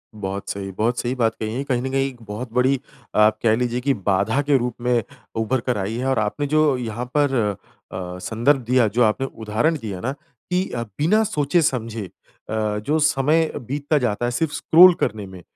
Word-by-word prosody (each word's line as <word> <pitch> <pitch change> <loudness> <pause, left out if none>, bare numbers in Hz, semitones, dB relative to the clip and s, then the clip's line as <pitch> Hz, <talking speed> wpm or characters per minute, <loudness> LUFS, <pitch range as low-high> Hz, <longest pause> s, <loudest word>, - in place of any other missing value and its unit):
बहुत 100 -1 -5
सही, 95 -1 -4
बहुत 115 +5 -1
सही 125 +2 -2
बात 115 -2 +1
कही 110 0 -3
है। 135 - -2
कहीं 125 -3 -1
न 130 - -3
कहीं 135 0 +1
एक 120 -3 -15
बहुत 110 +3 -6
बड़ी 130 +2 +2 0.4
आप 105 0 +4
कह 110 -1 +4
लीजिए 120 0 -1
कि 140 +1 +2
बाधा 100 +6 +1
के 145 -1 +3
रूप 125 -1 -2
में 120 -2 +1 0.4
उभरकर 125 0 -1
आई 100 +3 -2
है 125 - -3
और 130 - +2
आपने 110 +8 -1
जो 150 -4 +4
यहाँ 120 0 -4
पर 145 -2 +2 0.6
अ, 90 -1 -6
संदर्भ 120 +8 +1
दिया 125 -3 +4
जो 120 +4 +2
आपने 110 +5 +1 0.2
उदाहरण 110 +10 +1
दिया 100 -4 -5
ना 125 - -1 0.4
कि 180 +1 +2
अ, 120 -1 -3
बिना 155 - +1
सोचे-समझे 140 - 0
अ, 90 - -13 0.7
जो 155 +2 +1
समय 155 +2 +2 0.2
बीतता 145 +3 0
जाता 120 -3 0
है 120 - 0
सिर्फ़ 150 +4 -1
स्क्रॉल 180 +2 +7
करने 105 -1 -2
में 95 -1 -11
125 Hz, 195 wpm, -22 LUFS, 110-140 Hz, 0.7 s, स्क्रॉल